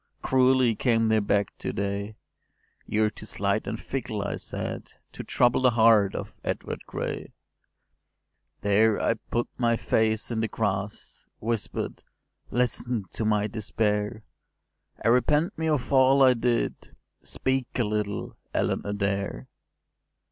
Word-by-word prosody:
Cruelly 130 -2 +4
came 115 0 +2
they 110 0 +4
back 100 -1 0
to - - -3
day: 100 +2 -3 0.7
‘You’re 105 0 +2
too 110 - -9
slight 100 +1 -1
and 110 - -3
fickle,’ 120 -6 -3
I - - -3
said, - - -5 0.2
‘To - - -7
trouble 125 +1 +2
the 130 - +6
heart 110 -4 +4
of - - -5
Edward - - -3
Gray’. - - -4 1.3
“There 105 +1 +3
I - - +2
put 120 +1 -3
my 120 -1 +3
face 110 0 +1
in 115 - -1
the 115 - +1
grass— 105 -2 -3
Whisper’d, 115 -1 -3 0.5
‘Listen 120 -3 0
to - - -3
my 105 -1 +2
despair: 105 0 -1 0.8
I - - +5
repent 150 - +3
me 160 0 -1
of 140 -4 0
all 135 +1 +6
I 130 -1 +7
did: 120 0 -1 0.3
Speak 130 -1 -1
a 120 - +2
little, 105 -1 -2 0.2
Ellen - - +1
Adair! 100 - -2
110 Hz, 135 wpm, -27 LUFS, 105-125 Hz, 1.3 s, I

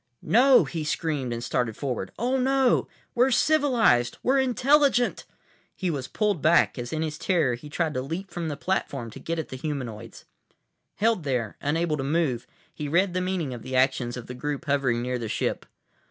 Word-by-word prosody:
"No!" 255 0 +6
he 155 +2 -4
screamed 150 -4 -2
and 120 0 -4
started 120 -3 -1
forward. 125 -9 -3
"Oh, 250 +4 0
no! 265 -1 +2 0.3
We're 250 +2 +3
civilized. 245 - +3
We're 270 +2 +3
intelligent!" 265 0 +2 0.5
He 185 -3 -1
was 135 -4 -4
pulled 205 -7 0
back, - - +3
as 120 0 -5
in 160 0 -1
his 155 -1 -4
terror 165 -10 +1
he 135 +5 -8
tried 160 0 -1
to 130 - -2
leap 165 +8 -5
from 170 -2 -4
the 145 -2 -4
platform 140 -10 -2
to - - -10
get 165 0 -3
at 160 - -4
the 130 - -6
humanoids. 120 -6 -6 0.7
Held 220 -4 +1
there, 125 -6 -2
unable 155 +2 0
to 135 - -3
move, 135 -5 0 0.3
he 150 - -5
read 175 +5 +2
the 185 - 0
meaning 180 -7 -2
of 120 - -7
the 130 +2 -5
actions 130 -2 +1
of 120 - -7
the 125 - -7
group 145 +4 -4
hovering 135 -5 +1
near 125 0 -2
the 115 -2 -4
ship. - - -2
150 Hz, 190 wpm, -26 LUFS, 125-190 Hz, 0.7 s, No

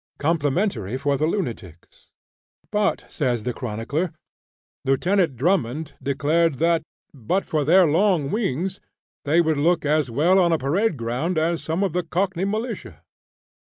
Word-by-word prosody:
Complimentary 145 - 0
for 140 +1 0
the 155 +3 0
Lunatics! 115 - -5 0.6
But, 210 -1 0
says 125 -7 -1
the 125 - -2
chronicler, 125 +9 -3 0.7
Lieutenant 170 +3 +1
Drummond 150 0 0
declared 150 +3 +1
that 165 +3 +2 0.3
"but 145 - -1
for 155 -2 0
their 180 +5 +5
long 165 -2 +2
wings, 190 - -2 0.4
they 160 +4 +4
would 160 -2 +1
look 165 +1 +2
as 150 -2 +2
well 165 +11 +3
on 175 -2 +3
a 165 - +3
parade 160 +7 0
ground 125 +9 -2
as 165 +1 +1
some 165 +5 -1
of 195 - -1
the 180 - +1
cockney 180 +2 -1
militia!" 220 +4 -4
160 Hz, 140 wpm, -23 LUFS, 135-180 Hz, 0.7 s, their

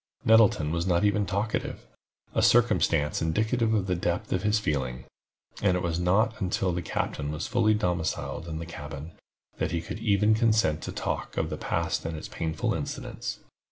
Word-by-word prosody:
Nettleton 110 -9 +5
was 85 +2 -1
not 90 +1 +2
even 105 -1 +2
talkative—a 100 +4 -4
circumstance 105 -11 +3
indicative 110 +8 +1
of 100 -3 +1
the 90 - 0
depth 85 0 -1
of 90 - 0
his 105 +1 +2
feelings—and 75 +4 -3
it 90 - -3
was 85 0 -1
not 105 +6 +2
until 95 0 0
the 90 - -2
captain 75 -3 -2
was 75 +1 -3
fully 110 -3 +3
domiciled 90 -4 -2
in 80 -1 -4
the 85 - -5
cabin, 75 -1 -8 0.5
that - - 0
he 85 - -1
could 85 - -6 0.4
consent 110 -9 +2
to - - -5
talk - - -4
of - - 0
the - - -1
past - - -1
and 80 -1 -4
its - - -6
painful 80 -2 -2
incidents. - - -5
90 Hz, 165 wpm, -27 LUFS, 80-105 Hz, 0.5 s, Nettleton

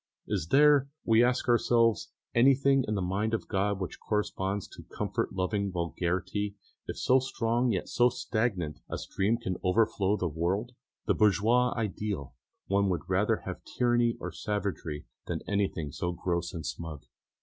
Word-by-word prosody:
Is 80 - -2
there, 140 - +5 0.2
we 115 +1 +5
ask 125 +1 +1
ourselves, 115 -4 +3 0.2
anything 135 +2 +4
in 105 - 0
the 95 - -1
mind 105 +5 0
of - - -5
God 100 0 0
which 95 - -5
corresponds 100 -2 -2
to - - -11
comfort - - -3
loving 100 +1 -1
vulgarity, 90 +3 -2 0.3
if - - -5
so 130 +1 +4
strong 120 -2 0
and 120 - +2
yet 90 - -2
so 120 0 +4
stagnant 110 -11 -2
a - - -3
stream 105 +4 0
can 95 -6 -3
overflow 105 +1 +2
the 90 - -1
world? 90 +9 -1 0.3
The - - +3
bourgeois 110 +5 +3
ideal! 100 - -3 0.3
One 100 0 +2
would 90 - -2
rather - - +1
have - - -5
tyranny 120 -1 +1
or - - -5
savagery 100 -8 -3 0.2
than - - -3
anything 95 -7 -1
so 85 +4 -2
gross 85 0 -2
and 80 -4 -6
smug. 75 -1 -6
105 Hz, 160 wpm, -29 LUFS, 90-115 Hz, 0.3 s, there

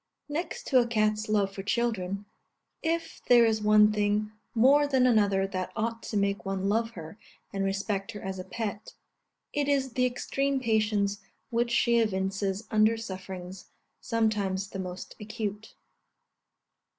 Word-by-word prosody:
Next 325 +3 -4
to 260 - +4
a 240 - +2
cat's 215 -1 +1
love 200 -2 +1
for 195 - -5
children, 200 -3 -1 0.6
if 330 +1 -2
there 240 -1 +7
is 220 -1 +1
one 210 0 +6
thing 210 0 0 0.2
more 280 +5 +5
than 265 -3 +3
another 205 -5 +3
that 185 -2 -4
ought 230 +1 -2
to 215 - -3
make 200 0 0
one 195 0 -2
love 225 +3 +1
her 165 +6 -9 0.3
and 195 0 -1
respect 195 0 -2
her 205 - -7
as 190 0 -5
a - - -4
pet, 210 0 -5 0.6
it 290 -2 0
is 270 -3 +1
the 250 +1 +3
extreme 275 +2 -1
patience 215 -4 +1 0.3
which 235 +1 +1
she 235 0 +3
evinces 195 -1 -1
under 215 +1 +4
sufferings, 190 -3 -7 0.3
sometimes 205 -4 0
the 195 - -5
most 180 0 -6
acute. 215 -1 -5
215 Hz, 150 wpm, -28 LUFS, 195-235 Hz, 0.6 s, there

